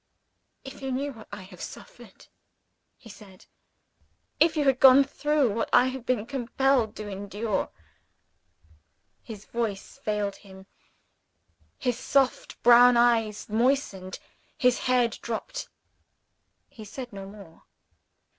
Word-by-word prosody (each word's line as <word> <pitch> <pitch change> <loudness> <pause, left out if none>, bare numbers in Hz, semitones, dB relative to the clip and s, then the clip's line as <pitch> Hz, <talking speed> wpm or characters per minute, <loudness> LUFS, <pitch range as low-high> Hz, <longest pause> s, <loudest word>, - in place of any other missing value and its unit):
"If 270 +1 -10
you 270 -1 -4
knew 275 +2 -2
what 220 -3 -14
I 190 - -8
have 185 - -14
suffered," - - -11 0.7
he 255 - -17
said; 200 -3 -15 0.9
"if 320 0 +3
you 295 - +2
had 265 -1 +3
gone 270 +1 +8
through 285 -3 0
what 225 - -2
I 255 +1 +5
have 260 -1 -8
been 240 -4 0
compelled 255 -2 0
to 210 - -7
endure 205 +1 -3 0.8
" - - -44 0.7
His 215 -3 -10
voice 225 -4 -4
failed 210 -2 -2
him; 190 -2 -15 1.1
his 245 -2 -2
soft 270 -1 0
brown 245 +1 +7
eyes 225 -3 +2
moistened; 220 -5 0 0.4
his 250 -1 +2
head 245 -2 +2
drooped. 235 - -5 1.0
He 220 - -12
said 245 +3 -8
no 195 -1 -8
more. 195 -5 -14
235 Hz, 125 wpm, -26 LUFS, 210-265 Hz, 1.1 s, gone